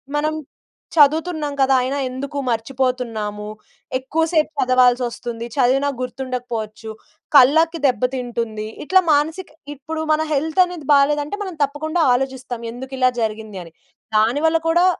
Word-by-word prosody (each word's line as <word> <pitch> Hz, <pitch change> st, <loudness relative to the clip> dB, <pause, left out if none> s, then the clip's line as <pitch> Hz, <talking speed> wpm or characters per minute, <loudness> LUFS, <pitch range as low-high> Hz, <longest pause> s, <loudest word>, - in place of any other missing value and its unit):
మనం 305 Hz, +1 st, 0 dB, 0.6 s
చదువుతున్నాం 310 Hz, 0 st, +3 dB
కదా. 270 Hz, 0 st, +4 dB
అయినా 265 Hz, +3 st, -2 dB
ఎందుకు 275 Hz, +3 st, -6 dB
మర్చిపోతున్నాము, 230 Hz, -3 st, -2 dB, 0.5 s
ఎక్కువసేపు 315 Hz, +4 st, 0 dB
చదవాల్సొస్తుంది, 245 Hz, -2 st, +1 dB
చదివినా 270 Hz, +1 st, +2 dB
గుర్తుండకపోవచ్చు, 245 Hz, -4 st, -5 dB, 0.5 s
కళ్ళకి 320 Hz, +5 st, +5 dB
దెబ్బతింటుంది. 240 Hz, -3 st, -2 dB, 0.2 s
ఇట్లా 375 Hz, +4 st, +5 dB
మానసిక 320 Hz, +5 st, 0 dB, 0.3 s
ఇప్పుడు 315 Hz, +3 st, -5 dB
మన 305 Hz, -, +1 dB
హెల్త్ 315 Hz, +5 st, +2 dB
అనేది 350 Hz, -6 st, -9 dB
బాలేదంటే, 290 Hz, +5 st, +2 dB
మనం 375 Hz, -3 st, -6 dB
తప్పకుండా 310 Hz, +4 st, -1 dB
ఆలోచిస్తాం. 255 Hz, -2 st, -3 dB
ఎందుకు 265 Hz, +3 st, -8 dB
ఇలా 255 Hz, -1 st, +5 dB
జరిగింది 215 Hz, -2 st, -4 dB
అని. 165 Hz, -1 st, -15 dB, 0.4 s
దాని 230 Hz, +7 st, +2 dB
వల్ల 325 Hz, +1 st, +2 dB
కూడా 345 Hz, +2 st, +4 dB
265 Hz, 115 wpm, -20 LUFS, 245-305 Hz, 0.6 s, కళ్ళకి